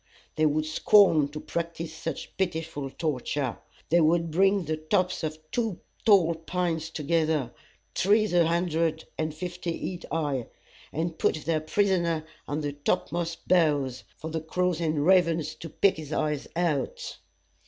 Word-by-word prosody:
They 155 0 +3
would 155 +1 +1
scorn 160 -1 +5
to 150 +2 -7
practice 170 0 -4
such 160 - -6
pitiful 165 -6 -2
torture. 135 -5 -2 0.3
They 170 +1 +5
would 165 +1 +3
bring 195 +2 +3
the 155 +1 -1
tops 180 +4 0
of 155 0 -2
two 225 -7 -1 0.3
tall 185 -6 +6
pines 165 -1 -2
together, 155 -4 0 0.4
trees 210 +1 +3
a 170 -2 +5
hundred 165 -2 0
and 155 0 0
fifty 175 +1 -4
feet 180 -2 -5
high, 145 -6 -1 0.4
and 165 +2 -3
put 155 - +1
their 160 -2 +1
prisoner 170 -2 +1 0.2
on 145 +2 -2
the 145 -1 -2
topmost 165 +3 -2
boughs, 145 -8 +2
for 160 - -6
the 160 0 -2
crows 180 +1 0
and 155 -3 0
ravens 170 -4 +3
to 165 - -9
pick 190 +4 +2
his 155 -2 -8
eyes 150 -2 -1
out. 165 -6 -1
160 Hz, 145 wpm, -27 LUFS, 155-175 Hz, 0.4 s, tall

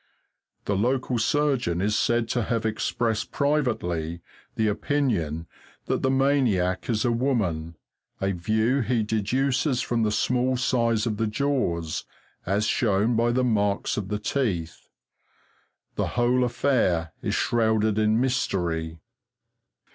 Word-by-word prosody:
The 100 - 0
local 125 +3 0
surgeon 130 - +1
is 105 +3 +1
said 120 +1 +1
to 120 - 0
have 115 0 -1
expressed 110 0 -1
privately 90 - -1 0.3
the 110 - +1
opinion 105 - -1 0.4
that - - -1
the 130 - +1
maniac 130 -10 +1
is 110 -1 +1
a 120 - +2
woman, 100 - -1 0.4
a 95 0 0
view 110 +8 +1
he 120 -2 +1
deduces 125 +5 0
from 120 -1 -1
the 110 - +2
small 125 +3 +1
size 115 -3 +1
of 110 -3 -2
the 110 - 0
jaws, 105 - -1 0.4
as 100 +3 +1
shown 110 +1 +1
by 115 +1 +2
the 130 +1 +1
marks 105 -4 +1
of 100 -3 -3
the 105 - -2
teeth. 105 -8 -2 1.1
The - - 0
whole 125 +1 +3
affair 105 -11 +1
is - - -1
shrouded 110 -2 +1
in 110 +1 +3
mystery. 85 -10 -1
110 Hz, 130 wpm, -25 LUFS, 100-125 Hz, 1.1 s, whole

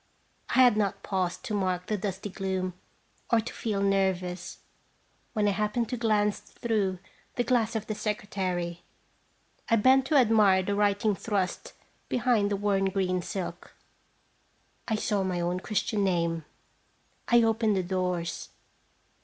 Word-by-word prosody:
I - - -3
had 245 -4 +5
not 200 -2 -1
paused 185 0 -2
to 225 - -3
mark 185 -3 0
the 215 - -1
dusty 195 0 -4
gloom, 190 -2 -2 0.6
or 230 - +5
to 225 - -5
feei 205 -3 -2
nervous, 190 -2 0 0.8
when 210 -2 +1
I - - +3
happened 210 +3 -1
to - - -1
glance 210 -3 +1 0.2
througn 205 -5 0 0.4
the 245 - +1
glass 235 -2 +1
of 215 -1 -2
the 215 - -3
secretary. 185 -5 -3 0.9
I 230 - +5
bent 260 +4 +4
to 300 - +1
admire 215 -7 +5
the 200 - -1
writing 205 +1 +2
thrust 195 -2 -2 0.4
behind 235 -4 +2
the 205 - 0
worn 200 -1 +1
green 185 -2 0
silk. 190 +1 -6 1.1
I 220 - +1
saw 210 -1 0
my 185 -2 -1
own 175 +1 -1
Christian 205 +1 -1
name. 170 -4 0 0.8
I 240 -1 +5
opened 225 -1 +2
the 190 - 0
doors. 180 -2 -2
200 Hz, 145 wpm, -28 LUFS, 185-215 Hz, 1.1 s, had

